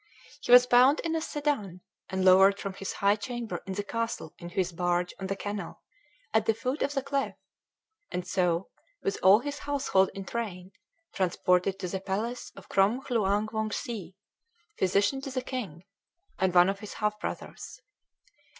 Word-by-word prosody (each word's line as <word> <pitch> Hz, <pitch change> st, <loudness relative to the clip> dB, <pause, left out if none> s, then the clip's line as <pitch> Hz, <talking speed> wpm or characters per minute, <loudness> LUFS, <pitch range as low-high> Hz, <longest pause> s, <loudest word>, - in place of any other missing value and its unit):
He -, -, -2 dB
was 245 Hz, 0 st, +10 dB
bound 250 Hz, +4 st, +5 dB
in 325 Hz, -1 st, -1 dB
a 320 Hz, -, 0 dB
sedan, 285 Hz, -, -2 dB, 0.3 s
and 190 Hz, -1 st, -1 dB
lowered 190 Hz, +2 st, +7 dB
from 195 Hz, -, -4 dB
his 195 Hz, +1 st, -5 dB
high 200 Hz, +1 st, +3 dB
chamber 235 Hz, +2 st, -5 dB
in 190 Hz, -, -3 dB
the 205 Hz, +2 st, -3 dB
castle 230 Hz, -7 st, -3 dB
into 175 Hz, 0 st, -9 dB
his 185 Hz, -2 st, +1 dB
barge 175 Hz, 0 st, 0 dB
on 190 Hz, -, -4 dB
the 195 Hz, -, -2 dB
canal 205 Hz, +1 st, -6 dB, 0.5 s
at 220 Hz, -1 st, +2 dB
the 225 Hz, -, +3 dB
foot 255 Hz, +6 st, -3 dB
of 285 Hz, +1 st, 0 dB
the 275 Hz, -, 0 dB
cliff; 275 Hz, 0 st, -1 dB, 0.7 s
and 180 Hz, 0 st, -4 dB
so, 180 Hz, -1 st, 0 dB, 0.3 s
with 195 Hz, -, -1 dB
all 195 Hz, +4 st, +7 dB
his 285 Hz, +1 st, -5 dB
household 270 Hz, -10 st, +1 dB
in 195 Hz, -1 st, -6 dB
train, 190 Hz, -6 st, -5 dB, 0.4 s
transported 185 Hz, +1 st, +1 dB
to 190 Hz, -2 st, -4 dB
the 190 Hz, +2 st, -3 dB
palace 210 Hz, +6 st, -3 dB
of 195 Hz, 0 st, -13 dB
Krom 205 Hz, +7 st, +2 dB
Hluang 215 Hz, -4 st, 0 dB
Wongse, 215 Hz, -3 st, -4 dB, 0.6 s
physician 200 Hz, +8 st, +2 dB
to 275 Hz, -, -5 dB
the 255 Hz, -1 st, -3 dB
king, 195 Hz, -, -5 dB, 0.6 s
and 190 Hz, -1 st, +2 dB
one 175 Hz, +1 st, +7 dB
of 195 Hz, 0 st, -2 dB
his 210 Hz, -1 st, -8 dB
half 210 Hz, 0 st, -1 dB
brothers. -, -, -6 dB
200 Hz, 170 wpm, -28 LUFS, 190-240 Hz, 0.7 s, was